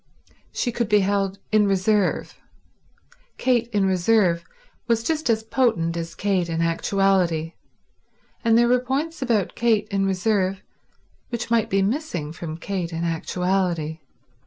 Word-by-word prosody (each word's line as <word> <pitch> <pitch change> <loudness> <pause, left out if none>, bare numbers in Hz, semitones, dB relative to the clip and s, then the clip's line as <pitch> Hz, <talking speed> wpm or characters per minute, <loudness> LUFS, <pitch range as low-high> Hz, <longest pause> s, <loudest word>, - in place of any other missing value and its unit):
She 245 - -1
could 235 -2 -2
be 210 -1 +5
held 195 0 0
in 215 -1 +4
reserve. 195 0 +1 1.0
Kate 240 -3 +1
in 205 -4 +1
reserve 185 -2 +2 0.4
was 230 -1 +1
just 315 +1 -1
as 220 -1 +2
potent 220 -8 +1
as 165 0 -5
Kate 190 -4 0
in 165 0 -2
actuality, 170 -1 +1 0.9
and 230 -1 +4
there 240 0 +4
were 250 +1 +4
points 275 +6 -3
about 230 -8 0
Kate 220 -3 +1
in 195 -1 0
reserve 195 0 0 0.7
which 235 -1 -4
might 230 -2 +2
be 195 0 +2
missing 195 - -2
from 160 -1 -6
Kate 180 -2 -4
in 165 0 -3
actuality. 170 -1 -1
195 Hz, 135 wpm, -23 LUFS, 175-230 Hz, 1.0 s, be